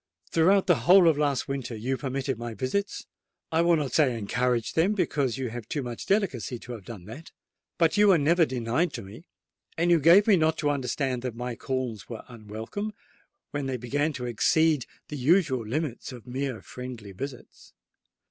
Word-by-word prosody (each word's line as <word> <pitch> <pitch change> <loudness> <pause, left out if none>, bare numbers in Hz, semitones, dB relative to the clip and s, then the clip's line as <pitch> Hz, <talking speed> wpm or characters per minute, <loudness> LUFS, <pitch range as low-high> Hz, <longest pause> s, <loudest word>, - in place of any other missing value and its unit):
Throughout 190 +4 +4
the 175 -3 +1
whole 185 -1 +8
of 160 - +5
last 145 -3 0
winter 135 -4 -4
you 125 +5 -2
permitted 135 -2 -3
my 120 -1 -5
visits—I 160 - -3
will 170 0 +4
not 145 -4 -2
say 130 -7 +3
encouraged 120 +2 0
them, 175 +6 +3
because 140 - 0
you 130 -2 -3
have 120 -1 -7
too 145 -4 -2
much 120 -2 -6
delicacy 190 - 0
to 125 - -10
have 110 -6 -8
done 105 -7 -9
that. 125 - -10 0.5
But 165 +3 +3
you 210 0 +6
were 190 -3 +6
never 165 +4 +4
denied 125 +7 -1
to - - -5
me; 105 - -12 0.5
and 170 +1 +2
you 170 - +5
gave 170 +7 +7
me 205 -4 +5
not 160 0 +2
to 145 -2 +1
understand 130 -1 -1
that 125 -2 -4
my 125 0 -4
calls 125 -5 -4
were 115 -2 -7
unwelcome, 115 - -6 0.6
when 145 -2 -3
they 130 -1 -2
began 145 +6 -1
to 125 -3 -5
exceed 150 +4 +2 0.2
the 150 - -5
usual 140 -3 +2
limits 140 +1 -3
of 120 -3 -11
mere 130 -1 -4
friendly 125 -5 -8
visits. 125 +6 -9
135 Hz, 185 wpm, -27 LUFS, 120-160 Hz, 0.6 s, whole